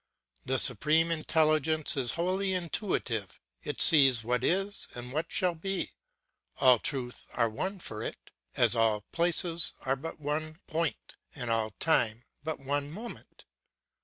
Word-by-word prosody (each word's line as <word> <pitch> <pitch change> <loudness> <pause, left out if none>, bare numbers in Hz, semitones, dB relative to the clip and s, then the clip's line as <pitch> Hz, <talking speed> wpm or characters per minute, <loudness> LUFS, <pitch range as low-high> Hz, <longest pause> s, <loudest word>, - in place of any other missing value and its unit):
The 130 +1 0
Supreme 155 +8 +3
Intelligence 155 -1 +1
is 125 -4 +1
wholly 185 +2 -1
intuitive, 165 - -3 0.2
it - - -6
sees 135 -7 +8
what 125 +2 -2
is 195 +6 0
and 125 +1 -8
what 160 +3 -3
shall 180 -3 +1
be; 190 +4 -4 0.7
all 125 -3 +5
truths 125 -2 -2
are 115 -1 +1
one 190 - -4
for 110 - -6
it, - - -8 0.2
as - - +4
all 110 -2 +1
places 170 0 +2
are 130 +1 -1
but 165 +4 -9
one 155 +2 -4
point 165 -1 -4 0.2
and 125 -5 -4
all 110 -1 0
time 115 -8 +1 0.2
but 160 0 -4
one 140 +1 -3
moment. 220 +9 -11
150 Hz, 140 wpm, -28 LUFS, 125-170 Hz, 0.7 s, sees